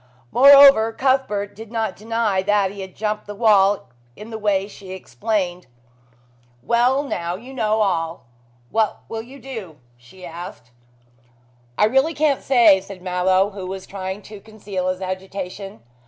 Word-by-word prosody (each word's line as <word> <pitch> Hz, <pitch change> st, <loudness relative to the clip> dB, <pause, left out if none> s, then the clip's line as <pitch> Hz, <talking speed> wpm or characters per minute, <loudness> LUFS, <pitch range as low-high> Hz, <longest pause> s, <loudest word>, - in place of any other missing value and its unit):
Moreover, 275 Hz, -4 st, +8 dB
Cuthbert 240 Hz, -6 st, 0 dB
did 220 Hz, +1 st, -11 dB
not 220 Hz, -5 st, -2 dB
deny 220 Hz, -2 st, -1 dB
that 200 Hz, -1 st, +1 dB
he 200 Hz, 0 st, -9 dB
had 190 Hz, -1 st, -9 dB
jumped 210 Hz, 0 st, -3 dB
the 205 Hz, -, -7 dB
wall 200 Hz, -, +3 dB, 0.3 s
in 215 Hz, +2 st, -11 dB
the 220 Hz, -, -6 dB
way 200 Hz, -2 st, 0 dB
she 195 Hz, -2 st, -11 dB
explained. 190 Hz, -2 st, -3 dB, 1.0 s
"Well, 245 Hz, -, +2 dB
now 175 Hz, -10 st, -3 dB
you 245 Hz, +7 st, -11 dB
know 220 Hz, -3 st, 0 dB
all, 165 Hz, -6 st, -1 dB, 0.5 s
what 220 Hz, -1 st, 0 dB
will 225 Hz, 0 st, -5 dB
you 255 Hz, +5 st, -13 dB
do?" 225 Hz, -, -9 dB, 0.2 s
she 125 Hz, +10 st, -15 dB
asked. 170 Hz, -7 st, -9 dB, 1.1 s
"I -, -, +4 dB
really 270 Hz, +8 st, +2 dB
can't 295 Hz, -2 st, +1 dB
say," 230 Hz, -7 st, +5 dB
said 190 Hz, -1 st, -11 dB
Mallow, 185 Hz, +2 st, +1 dB
who 195 Hz, -2 st, -7 dB
was 190 Hz, 0 st, -6 dB
trying 190 Hz, +1 st, -6 dB
to 210 Hz, 0 st, -11 dB
conceal 200 Hz, -4 st, -5 dB
his 185 Hz, 0 st, -2 dB
agitation. 185 Hz, -, -6 dB
205 Hz, 150 wpm, -21 LUFS, 185-225 Hz, 1.1 s, Moreover